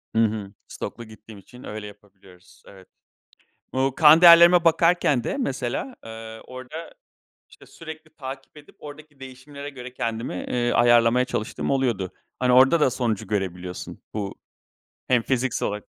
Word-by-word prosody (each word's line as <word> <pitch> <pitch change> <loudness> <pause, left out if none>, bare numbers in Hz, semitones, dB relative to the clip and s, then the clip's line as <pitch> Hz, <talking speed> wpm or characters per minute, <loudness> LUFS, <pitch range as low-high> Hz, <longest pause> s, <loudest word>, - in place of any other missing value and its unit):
Hı 115 - +4
hı. 105 -2 -4
Stoklu 120 - -7
gittiğim 110 -1 -14
için 125 +6 -16
öyle 105 0 -7
yapabiliyoruz. 95 -3 -19
Evet. 95 -2 -16 0.9
Bu 130 0 0
kan 155 +1 +7
değerlerime 170 0 +8
bakarken 165 -6 +3
de - - -2
mesela, 135 - -3
ııı, 110 0 -9
orada 130 +6 -10 0.6
işte - - -18
sürekli 155 -1 -12
takip 135 +1 -9
edip 145 - -16
oradaki 150 -1 -13
değişimlere 140 +2 -10
göre 125 -2 -10
kendimi, 115 -4 -4
eee, 120 +6 -2
ayarlamaya 120 +1 +4
çalıştığım 125 -1 -4
oluyordu. 115 -9 -1 0.3
Hani 125 -1 +2
orada 130 +6 +5
da 135 - +3
sonucu 110 -4 -2
görebiliyorsun 90 -3 -5
bu 100 -2 -4 0.7
hem 125 -2 +3
fiziksel 130 +1 -1
olarak 105 0 -5
125 Hz, 140 wpm, -23 LUFS, 110-145 Hz, 0.9 s, değerlerime